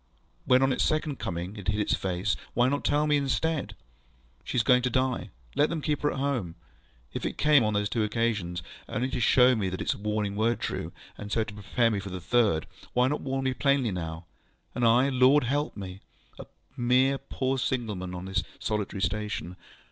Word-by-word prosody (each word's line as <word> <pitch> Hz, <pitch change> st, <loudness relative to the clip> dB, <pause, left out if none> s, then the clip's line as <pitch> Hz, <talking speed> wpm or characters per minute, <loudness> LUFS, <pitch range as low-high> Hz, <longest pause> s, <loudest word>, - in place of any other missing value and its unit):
When 130 Hz, +1 st, +5 dB
on 135 Hz, 0 st, +3 dB
its -, -, 0 dB
second 155 Hz, -3 st, 0 dB
coming 90 Hz, +4 st, -4 dB
it 100 Hz, -3 st, -8 dB
hid 105 Hz, +1 st, +1 dB
its 105 Hz, -, +1 dB
face, 95 Hz, +1 st, -1 dB, 0.2 s
why 120 Hz, +1 st, +4 dB
not 145 Hz, +1 st, -1 dB
tell 150 Hz, +1 st, +2 dB
me, 150 Hz, -1 st, +3 dB
instead, 140 Hz, -4 st, -1 dB, 0.7 s
ŌĆśShe -, -, -5 dB
is 120 Hz, -, +3 dB
going 125 Hz, +1 st, +5 dB
to 125 Hz, -, 0 dB
die. 130 Hz, 0 st, 0 dB, 0.3 s
Let 150 Hz, -, +3 dB
them 165 Hz, -, -2 dB
keep 150 Hz, -2 st, 0 dB
her 145 Hz, -, +1 dB
at -, -, -5 dB
homeŌĆÖ? 130 Hz, -11 st, -1 dB, 0.6 s
If -, -, -4 dB
it -, -, -3 dB
came, 150 Hz, -4 st, +5 dB
on 105 Hz, -1 st, 0 dB
those 105 Hz, 0 st, +1 dB
two 110 Hz, +1 st, 0 dB
occasions, 105 Hz, -6 st, -1 dB, 0.3 s
only 125 Hz, +4 st, -1 dB
to 130 Hz, -, -2 dB
show 125 Hz, +1 st, +5 dB
me 100 Hz, -4 st, -1 dB
that 95 Hz, -, -5 dB
its -, -, 0 dB
warnings 105 Hz, -1 st, -2 dB
were 115 Hz, +2 st, +2 dB
true, -, -, -4 dB, 0.3 s
and 105 Hz, 0 st, -7 dB
so 110 Hz, -, +2 dB
to 110 Hz, -, -8 dB
prepare 105 Hz, +3 st, +1 dB
me 105 Hz, -, 0 dB
for 100 Hz, 0 st, -7 dB
the 95 Hz, 0 st, -5 dB
third, 100 Hz, -4 st, +2 dB, 0.3 s
why 125 Hz, +1 st, +3 dB
not 150 Hz, -, -2 dB
warn 135 Hz, 0 st, -2 dB
me 130 Hz, -, +1 dB
plainly 140 Hz, -3 st, +2 dB
now? 80 Hz, -2 st, -5 dB, 0.5 s
And 125 Hz, -, -2 dB
I, 125 Hz, +4 st, +4 dB
Lord 130 Hz, +2 st, +5 dB
help 145 Hz, +3 st, -1 dB
me! 95 Hz, -1 st, -7 dB, 0.4 s
A -, -, -8 dB, 0.3 s
mere 130 Hz, +3 st, +3 dB
poor 135 Hz, -1 st, -2 dB
signal 120 Hz, -4 st, -1 dB
man 90 Hz, 0 st, -5 dB
on 90 Hz, +1 st, -6 dB
this 95 Hz, -1 st, 0 dB, 0.2 s
solitary 105 Hz, -3 st, -2 dB
station! 95 Hz, -2 st, -2 dB
115 Hz, 210 wpm, -28 LUFS, 100-135 Hz, 0.7 s, When